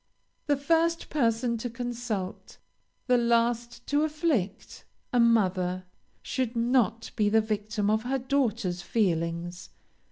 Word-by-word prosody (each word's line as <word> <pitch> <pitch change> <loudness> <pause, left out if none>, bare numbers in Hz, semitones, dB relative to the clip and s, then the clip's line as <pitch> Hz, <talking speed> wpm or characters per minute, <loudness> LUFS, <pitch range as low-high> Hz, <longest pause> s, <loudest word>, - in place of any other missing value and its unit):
The 290 -1 +3
first 330 +4 +1
person 235 -3 +1
to 245 - -3
consult, 235 -5 -5 0.5
the 250 -1 +4
last 235 0 +1
to 290 +1 +1
afflict 300 - -1 0.3
a 245 - +3
mother 185 -6 +2 0.4
should 255 -3 -2
not 230 -2 +1
be 210 -3 +2
the 220 +1 +4
victim 215 -1 -1
of 215 +1 +2
her 255 +3 -1
daughter's 235 -9 0
feelings. 175 -3 -1
230 Hz, 120 wpm, -28 LUFS, 205-250 Hz, 0.5 s, the